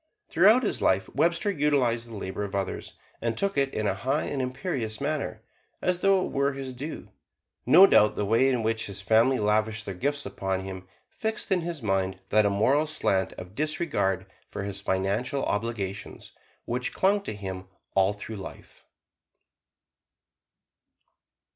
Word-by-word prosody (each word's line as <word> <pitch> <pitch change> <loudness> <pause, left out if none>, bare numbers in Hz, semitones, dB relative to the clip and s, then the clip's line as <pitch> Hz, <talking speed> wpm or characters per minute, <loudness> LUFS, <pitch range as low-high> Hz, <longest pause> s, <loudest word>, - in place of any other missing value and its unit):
Throughout 215 +9 +5
his 215 - -1
life 95 +1 +2
Webster 170 +5 +2
utilized 135 -8 +1
the 115 - -8
labor 100 0 -4
of 100 -1 -5
others, 95 -1 -3 0.3
and 115 -1 -1
took 200 0 0
it 135 -1 +1
in 110 - -2
a 100 - +2
high 130 +9 -1
and 140 - -2
imperious 130 -4 -3
manner, 150 +1 -3 0.4
as 180 -1 0
though 195 -1 +3
it - - -6
were 140 0 +1
his 135 -1 -6
due. 145 +6 -7 0.6
No 175 +9 +9
doubt 105 - +5
the 105 - -1
way 115 +6 +4
in 125 -4 0
which 115 0 -1
his 100 -1 -7
family 115 +6 +3
lavished 110 0 +1
their 100 - -4
gifts 145 +9 -1
upon 95 -1 -2
him 95 -1 -7 0.2
fixed 220 -1 -4
in 185 -2 +3
his 165 -5 -5
mind 95 -2 0
that 105 -1 +4
immoral 125 +10 +2
slant 100 -11 0
of 90 +1 -10
disregard 145 - -1 0.2
for 100 - -5
his 100 0 -4
financial 100 +8 -1
obligations 105 -2 -4 0.3
which 125 +2 -2
clung 200 +2 +2
to 150 - -5
him 95 -2 -6 0.3
all 95 +1 +4
through 105 +1 -7
life. 95 - -11
115 Hz, 160 wpm, -27 LUFS, 100-145 Hz, 0.6 s, No